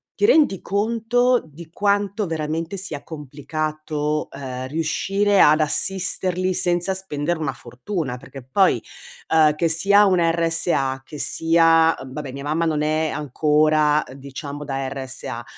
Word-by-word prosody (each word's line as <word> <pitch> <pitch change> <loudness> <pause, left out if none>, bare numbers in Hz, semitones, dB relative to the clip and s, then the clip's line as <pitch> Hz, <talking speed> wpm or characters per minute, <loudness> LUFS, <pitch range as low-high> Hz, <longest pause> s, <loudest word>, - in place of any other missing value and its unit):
ti - - +2
rendi 295 - +4
conto 230 +4 +1
di 160 +1 -13
quanto 200 +1 0
veramente 160 +3 -3
sia 170 -7 -5
complicato, 150 0 -4
ehm, 130 -2 -6
riuscire 195 +7 +1
ad 155 +1 +6
assisterli 185 +3 0
senza 175 +1 0
spendere 175 -3 -3
una 150 -4 -1
fortuna, 130 - -5
perché 135 +1 -11
poi, 185 +10 +2 0.5
ehm, 155 -2 +4
che 165 +2 +1
sia 200 +6 +4
un 185 -3 +3
RSA, 165 -5 0
che 150 - -10
sia 165 +1 +3
vabbè, 135 +1 -7
mia 140 +1 -7
mamma 155 +3 0
non 155 -2 0
è 155 +1 0
ancora, 150 +1 +2
diciamo, 140 +2 -8
da 135 -2 -3
RSA, 130 -3 -6
155 Hz, 130 wpm, -22 LUFS, 145-185 Hz, 0.5 s, ad